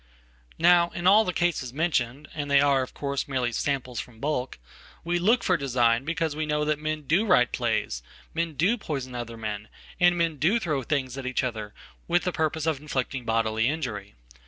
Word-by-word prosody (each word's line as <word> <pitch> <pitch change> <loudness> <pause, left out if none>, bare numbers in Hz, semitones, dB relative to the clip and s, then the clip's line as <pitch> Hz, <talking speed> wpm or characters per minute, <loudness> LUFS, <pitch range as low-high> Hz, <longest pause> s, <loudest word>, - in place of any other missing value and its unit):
Now 170 0 +5
in 175 - -4
all 205 +4 +7
the 180 - 0
cases 175 -8 0
mentioned, 145 -3 0
and 145 -2 -4
they 140 0 +5
are, 140 -1 +4
of 130 - -6
course, 140 -1 -2
merely 130 -3 -1
"samples 130 -1 -2
from 115 -3 -8
bulk," 135 -2 -2 0.5
we 175 +1 0
look 225 +7 +3
for 185 - +3
design 125 -2 +2
because 165 -2 -1
we 155 0 -2
know 150 0 0
thatmen 155 0 -1
do 170 +9 +3
write 180 - +4
plays. - - -1 0.3
men 165 0 -1
do 200 - +2
poison 135 -8 -4
other 120 -1 -5
men, 110 -1 -5 0.3
and 175 -1 +5
men 165 -2 0
do 170 - +3
throwthings 140 - -2
at 130 - -5
each 130 +1 0
other, 110 -4 -4 0.3
with 175 +1 +2
the 180 - 0
purpose 160 -1 -1
of 160 -4 0
inflicting 135 -4 -3
bodily 115 0 +1
injury. 130 - -4
145 Hz, 185 wpm, -26 LUFS, 125-165 Hz, 0.5 s, all